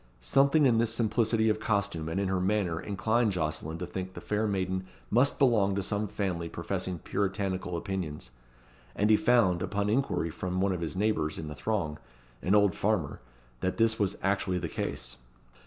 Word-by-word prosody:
Something 140 Hz, -, +4 dB
in 120 Hz, -4 st, +4 dB
this 115 Hz, -1 st, +2 dB
simplicity 110 Hz, 0 st, +2 dB
of 110 Hz, 0 st, +2 dB
costume 100 Hz, -7 st, -1 dB
and 85 Hz, -, -1 dB
in 100 Hz, -, 0 dB
her 95 Hz, -1 st, 0 dB
manner 95 Hz, -4 st, 0 dB
inclined 110 Hz, +2 st, +1 dB
Jocelyn 80 Hz, -1 st, -2 dB
to 90 Hz, -, -4 dB
think 95 Hz, +1 st, -6 dB
the -, -, -5 dB
fair 105 Hz, +1 st, -1 dB
maiden 95 Hz, -1 st, -1 dB, 0.2 s
must 125 Hz, +6 st, +4 dB
belong 110 Hz, -8 st, +3 dB
to 100 Hz, -, -1 dB
some 100 Hz, +2 st, 0 dB
family 95 Hz, -5 st, -2 dB
professing 90 Hz, +1 st, -3 dB
Puritanical 95 Hz, 0 st, -2 dB
opinions; 80 Hz, -9 st, -4 dB, 0.6 s
and 105 Hz, +2 st, +2 dB
he -, -, +8 dB
found, 105 Hz, -7 st, +3 dB
upon 100 Hz, +2 st, -1 dB
inquiry 115 Hz, -, 0 dB
from 90 Hz, +3 st, -3 dB
one 95 Hz, +1 st, +2 dB
of 90 Hz, -2 st, -2 dB
his 85 Hz, +2 st, -3 dB
neighbours 95 Hz, -7 st, 0 dB
in 75 Hz, -, -5 dB
the 75 Hz, -, -7 dB
throng 80 Hz, -5 st, -2 dB, 0.4 s
an 95 Hz, +3 st, +2 dB
old 100 Hz, -3 st, +4 dB
farmer 95 Hz, -9 st, -1 dB, 0.4 s
that 95 Hz, -, -1 dB
this 115 Hz, -1 st, +2 dB
was 100 Hz, -2 st, 0 dB
actually 95 Hz, -1 st, +1 dB
the -, -, -2 dB
case. -, -, -4 dB
100 Hz, 180 wpm, -29 LUFS, 90-110 Hz, 0.6 s, he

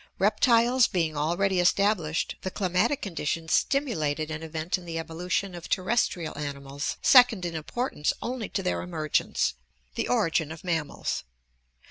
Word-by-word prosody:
Reptiles 235 Hz, +4 st, +4 dB
being 165 Hz, -4 st, -1 dB
already 175 Hz, +6 st, +1 dB
established, 175 Hz, -3 st, +2 dB
the 190 Hz, -, -3 dB
climatic 195 Hz, +8 st, 0 dB
conditions 165 Hz, -3 st, -3 dB
stimu 275 Hz, -4 st, -1 dB
lated 155 Hz, +1 st, -1 dB
an 160 Hz, 0 st, -4 dB
event 160 Hz, +1 st, -2 dB
in 175 Hz, -, -13 dB
the 165 Hz, -1 st, -4 dB
evolution 175 Hz, +4 st, -2 dB
of 175 Hz, -1 st, -9 dB
terrestrial 185 Hz, -4 st, 0 dB
animals 140 Hz, 0 st, -4 dB
second 245 Hz, -8 st, +6 dB
in 170 Hz, -, -3 dB
importance 160 Hz, -, -1 dB
only 240 Hz, -3 st, -4 dB
to 195 Hz, -, -2 dB
their 180 Hz, -, -1 dB
emergence: 160 Hz, -4 st, 0 dB, 0.4 s
the -, -, -2 dB
origin 160 Hz, +5 st, +1 dB
of 160 Hz, -, -9 dB
mammals. 165 Hz, -5 st, -2 dB
175 Hz, 140 wpm, -27 LUFS, 155-200 Hz, 0.4 s, second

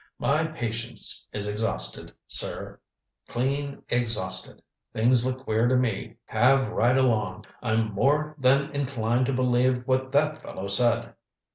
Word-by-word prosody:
My 155 Hz, +3 st, +1 dB
patience 120 Hz, -6 st, -4 dB
is 105 Hz, 0 st, -3 dB
exhausted, 110 Hz, +2 st, 0 dB
sir -, -, -1 dB, 0.5 s
clean 140 Hz, +3 st, -2 dB
exhausted. 110 Hz, -6 st, 0 dB, 0.3 s
Things 120 Hz, +2 st, +3 dB
look 130 Hz, +1 st, -3 dB
queer 110 Hz, 0 st, +1 dB
to 130 Hz, +1 st, +3 dB
me 120 Hz, -6 st, -2 dB
have 130 Hz, +2 st, +3 dB
right 120 Hz, +4 st, +2 dB
along. 110 Hz, -8 st, 0 dB, 0.2 s
I'm 110 Hz, -2 st, 0 dB
more 150 Hz, +8 st, +1 dB
than 135 Hz, +2 st, +3 dB
inclined 130 Hz, -4 st, 0 dB
to 135 Hz, -, 0 dB
believe 125 Hz, 0 st, +1 dB
what 130 Hz, 0 st, 0 dB
that 150 Hz, +2 st, +1 dB
fellow 95 Hz, -, -7 dB
said." 115 Hz, +2 st, +2 dB
125 Hz, 130 wpm, -26 LUFS, 115-135 Hz, 0.5 s, Things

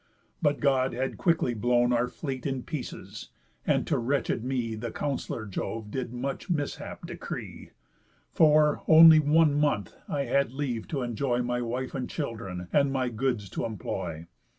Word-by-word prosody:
But 145 Hz, -3 st, +2 dB
God 135 Hz, -2 st, +2 dB
had 130 Hz, +2 st, -3 dB
quickly 165 Hz, -8 st, +2 dB
blown 120 Hz, +2 st, +2 dB
Our 120 Hz, +1 st, +2 dB
fleet 135 Hz, 0 st, -5 dB
in 135 Hz, -2 st, -3 dB
pieces; 150 Hz, -5 st, -7 dB, 0.4 s
and -, -, +2 dB
to -, -, 0 dB
wretched 125 Hz, -1 st, 0 dB
me 125 Hz, -3 st, -2 dB
The 115 Hz, +2 st, -4 dB
counsellor 130 Hz, -4 st, -3 dB
Jove 105 Hz, +2 st, -5 dB
did 125 Hz, -1 st, -3 dB
much 135 Hz, +9 st, -4 dB
mishap 145 Hz, -5 st, -3 dB
decree, -, -, -7 dB, 0.6 s
For, 150 Hz, -1 st, +4 dB
only 160 Hz, 0 st, +9 dB
one 155 Hz, 0 st, +4 dB
month, 145 Hz, -10 st, 0 dB, 0.2 s
I 145 Hz, -2 st, 0 dB
had 140 Hz, -2 st, +1 dB
leave 130 Hz, -5 st, -3 dB
t' 140 Hz, -4 st, -2 dB
enjoy 120 Hz, +1 st, -1 dB
My 125 Hz, 0 st, -1 dB
wife 125 Hz, +2 st, -3 dB
and 130 Hz, -2 st, -3 dB
children, 105 Hz, -, -5 dB
and 140 Hz, -1 st, +3 dB
my 130 Hz, -2 st, 0 dB
goods 120 Hz, -3 st, -1 dB
t' -, -, -4 dB
employ. 85 Hz, -6 st, -4 dB
130 Hz, 155 wpm, -28 LUFS, 120-145 Hz, 0.6 s, only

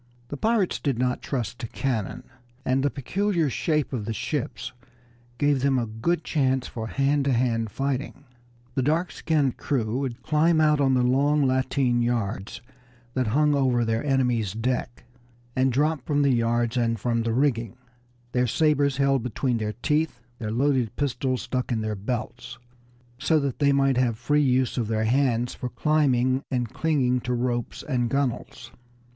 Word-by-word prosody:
The -, -, -4 dB
pirates 220 Hz, 0 st, +1 dB
did 140 Hz, -5 st, -1 dB
not 125 Hz, 0 st, 0 dB
trust 120 Hz, -4 st, -3 dB
to 120 Hz, -, -4 dB
cannon, 115 Hz, -5 st, -3 dB, 0.4 s
and 130 Hz, +1 st, +2 dB
the 145 Hz, -, +2 dB
peculiar 170 Hz, +3 st, -1 dB
shape 150 Hz, +1 st, 0 dB
of 110 Hz, -5 st, -3 dB
the 110 Hz, 0 st, -3 dB
ships 130 Hz, -2 st, -3 dB, 0.6 s
gave 145 Hz, -2 st, +2 dB
them 135 Hz, -1 st, +2 dB
a 120 Hz, -, 0 dB
good 115 Hz, +10 st, -1 dB
chance 130 Hz, -4 st, +1 dB
for 110 Hz, -2 st, -5 dB
hand 140 Hz, +3 st, +1 dB
to 140 Hz, -, +2 dB
hand 115 Hz, -2 st, +1 dB
fighting. 135 Hz, +4 st, -3 dB, 0.5 s
The 135 Hz, -, 0 dB
dark 160 Hz, +7 st, +1 dB
skinned 145 Hz, -5 st, 0 dB
crew 120 Hz, -3 st, -1 dB
would 130 Hz, -4 st, -4 dB
climb 155 Hz, +2 st, +3 dB
out 150 Hz, -2 st, +3 dB
on 135 Hz, -1 st, +3 dB
the 125 Hz, -, +3 dB
long 140 Hz, +4 st, +3 dB
lateen 130 Hz, -1 st, +1 dB
yards 110 Hz, -4 st, -2 dB, 0.5 s
that 130 Hz, -2 st, 0 dB
hung 150 Hz, +6 st, +3 dB
over 130 Hz, -4 st, +2 dB
their 115 Hz, 0 st, 0 dB
enemies' 125 Hz, -8 st, +1 dB
deck, 120 Hz, +2 st, -2 dB, 0.5 s
and 130 Hz, 0 st, +2 dB
drop 145 Hz, +2 st, +1 dB
from 145 Hz, 0 st, +1 dB
the 140 Hz, -2 st, +3 dB
yards 120 Hz, 0 st, +1 dB
and 115 Hz, -2 st, +1 dB
from 115 Hz, +1 st, 0 dB
the 115 Hz, 0 st, -1 dB
rigging, 120 Hz, -3 st, 0 dB, 0.6 s
their 125 Hz, 0 st, +1 dB
sabers 145 Hz, 0 st, +2 dB
held 140 Hz, -2 st, +2 dB
between 120 Hz, +1 st, -1 dB
their 105 Hz, -1 st, -2 dB
teeth, 150 Hz, -4 st, +1 dB, 0.2 s
their 110 Hz, -3 st, -3 dB
loaded 125 Hz, -1 st, +1 dB
pistols 130 Hz, -2 st, -1 dB
stuck 130 Hz, 0 st, -2 dB
in 115 Hz, -2 st, 0 dB
their 110 Hz, 0 st, -2 dB
belts, 120 Hz, +3 st, -5 dB, 0.6 s
so 155 Hz, +3 st, +3 dB
that 140 Hz, -3 st, -3 dB
they 140 Hz, -1 st, +4 dB
might 135 Hz, -2 st, +2 dB
have 120 Hz, -3 st, +1 dB
free 150 Hz, +5 st, +2 dB
use 130 Hz, -2 st, +1 dB
of 115 Hz, -, -1 dB
their 110 Hz, 0 st, 0 dB
hands 120 Hz, -1 st, +1 dB
for 125 Hz, -, -5 dB
climbing 130 Hz, -2 st, +2 dB
and 125 Hz, -2 st, -2 dB
clinging 135 Hz, -6 st, +1 dB
to 125 Hz, 0 st, -2 dB
ropes 120 Hz, -1 st, -2 dB
and 125 Hz, -5 st, 0 dB
gunwales. 135 Hz, -1 st, -2 dB
130 Hz, 170 wpm, -25 LUFS, 120-140 Hz, 0.6 s, they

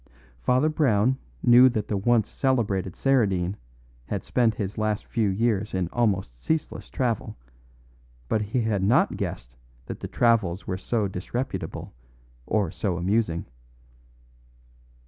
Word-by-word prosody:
Father 125 Hz, -, +2 dB
Brown 130 Hz, -5 st, +2 dB, 0.2 s
knew 125 Hz, +2 st, +8 dB
that 110 Hz, -4 st, -2 dB
the 105 Hz, -, -1 dB
once 110 Hz, +2 st, +2 dB
celebrated 105 Hz, -9 st, 0 dB
Saradine 100 Hz, -9 st, +1 dB, 0.5 s
had -, -, -3 dB
spent 115 Hz, -3 st, +1 dB
his 100 Hz, +2 st, -4 dB
last 110 Hz, -1 st, -1 dB
few 110 Hz, -4 st, 0 dB
years 105 Hz, 0 st, 0 dB
in 90 Hz, -2 st, -1 dB
almost 95 Hz, -, -1 dB
ceaseless 160 Hz, -, -2 dB
travel, 120 Hz, -6 st, -2 dB, 0.9 s
but 110 Hz, -, +1 dB
he 105 Hz, +4 st, -1 dB
had 110 Hz, -3 st, 0 dB
not 100 Hz, +6 st, +3 dB
guessed -, -, -5 dB, 0.3 s
that -, -, -7 dB
the -, -, -5 dB
travels 105 Hz, -6 st, +1 dB
were 95 Hz, -, -2 dB
so 105 Hz, +2 st, -1 dB
disreputable 100 Hz, +7 st, -4 dB, 0.5 s
or 100 Hz, -6 st, +1 dB
so 95 Hz, -5 st, -2 dB
amusing. 90 Hz, -1 st, 0 dB
105 Hz, 125 wpm, -25 LUFS, 95-120 Hz, 0.9 s, knew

